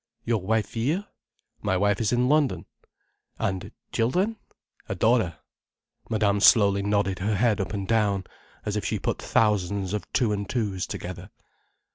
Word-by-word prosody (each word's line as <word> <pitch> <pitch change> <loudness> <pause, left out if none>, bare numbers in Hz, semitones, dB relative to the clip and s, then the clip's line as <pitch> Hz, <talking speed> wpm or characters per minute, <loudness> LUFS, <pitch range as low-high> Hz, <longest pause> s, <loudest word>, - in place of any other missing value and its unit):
"Your 115 -3 +1
wife 110 +3 0
here?" 150 - 0 0.6
"My 100 -3 +1
wife 100 +3 +2
is 110 - +1
in 125 +1 +2
London." 145 -1 +2 0.7
"And 95 +1 -2 0.2
children—?" 180 - +1 0.5
"A - - -2
daughter." 110 -8 +2 0.7
Madame 105 -2 +2
slowly 100 -1 +6
nodded 100 -1 0
her 105 +3 0
head 110 -1 +2
up 95 - -4
and 100 -2 -3
down, 105 -4 +2 0.4
as - - -2
if - - -1
she - - -1
put - - -2
thousands 100 -2 +1
of 105 - -4
two 120 -5 +2
and 100 -1 -4
two's 100 -7 -1
together. - - -7
105 Hz, 150 wpm, -26 LUFS, 100-115 Hz, 0.7 s, slowly